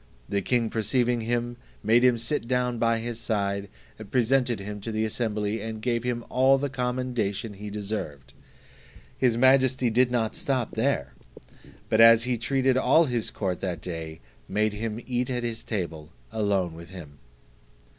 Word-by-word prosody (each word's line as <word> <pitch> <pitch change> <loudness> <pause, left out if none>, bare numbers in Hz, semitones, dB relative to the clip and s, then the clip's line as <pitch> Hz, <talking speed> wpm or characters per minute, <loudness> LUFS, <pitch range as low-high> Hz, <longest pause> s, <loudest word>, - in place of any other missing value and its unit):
The 100 - 0
king 115 +2 0
perceiving 120 +1 +1
him, 120 +1 -2 0.3
made 115 +3 +4
him 125 -2 +5
sit 115 +1 -2
down 125 -1 0
by 115 0 +2
his 115 0 -4
side, 100 -3 -1 0.4
presented 125 -1 +2
him 105 +1 -6
to 115 - -4
the 110 0 0
assembly, 110 -1 -2
and 110 -1 -5
gave 120 0 -1
him 120 -1 -2
all 130 +2 +4
the 140 0 -2
commendation 125 -4 -2
he 105 +1 -8
deserved. 100 -9 -5 0.8
His 120 -3 +2
majesty 130 -1 +4
did 125 +2 +3
not 115 -3 -1
stop 130 -4 -1
here: 95 - 0 0.7
but 110 - +3
as 115 0 +8
he 125 -1 -1
treated 130 +1 +1
all 165 +5 +5
his 120 -5 -1
court 95 -4 -3
that 90 -4 -3
day, 80 -3 -6 0.3
made 105 +1 +1
him 110 +1 -4
eat 125 0 -1
at 125 -1 -2
his 115 -1 -4
table 85 -7 -4 0.2
alone 100 -6 0
with 85 0 -11
him. 80 -6 -11
115 Hz, 160 wpm, -26 LUFS, 105-125 Hz, 0.8 s, as